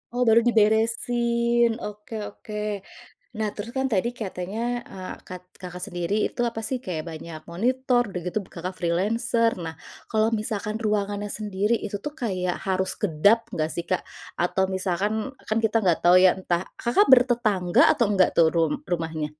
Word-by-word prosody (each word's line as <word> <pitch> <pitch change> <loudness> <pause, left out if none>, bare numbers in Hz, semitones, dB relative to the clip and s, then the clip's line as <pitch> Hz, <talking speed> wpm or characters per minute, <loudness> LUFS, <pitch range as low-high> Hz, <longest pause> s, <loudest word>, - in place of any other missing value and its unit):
Oh, 250 - +2
baru 225 +1 +7
diberesin, 235 +2 +2
oke 210 +2 -7 0.2
oke. 215 - -12 0.9
Nah, 215 -1 0
terus 215 +3 -6
kan 265 - +1
tadi 195 +3 +2
katanya, 190 0 -4 0.3
eee, 185 -1 -7
kat 180 0 -8 0.2
Kakak 180 -1 -7
sendiri 175 -1 -3
itu, - - -6
apa 235 -1 -1
sih, 260 - -1
kayak 160 -4 -3
banyak 160 0 -8
monitor, 250 +6 +1
udah 180 -2 -4
gitu 180 - -1
b - - -15
Kakak 180 +2 -5
freelancer. 220 +7 +1
Nah, 160 0 -5 0.4
kalau 220 0 +2
misalkan 215 -1 -2
ruangannya 205 -1 -1
sendiri, 210 +1 0
itu 205 - -4
tuh 295 - -4
kayak 185 -5 -1
harus 190 0 0
kedap 200 +3 +4 0.2
enggak 155 -1 -1
sih, 170 - -4
Kak? 185 - 0 0.4
Atau 190 +2 +1
misalkan, 190 +2 0 0.3
kan 215 - 0
kita 220 +1 +2
gak 170 -3 +4
tau 175 +1 +6
ya 185 0 +6
entah 175 -1 -1 0.2
Kakak 245 - +4
bertetangga 225 -8 +4
atau 235 - +2
enggak 190 -3 +4
tuh 165 - +5
rum 165 -2 +1
rumahnya? 160 -3 -2
205 Hz, 165 wpm, -25 LUFS, 180-230 Hz, 0.9 s, baru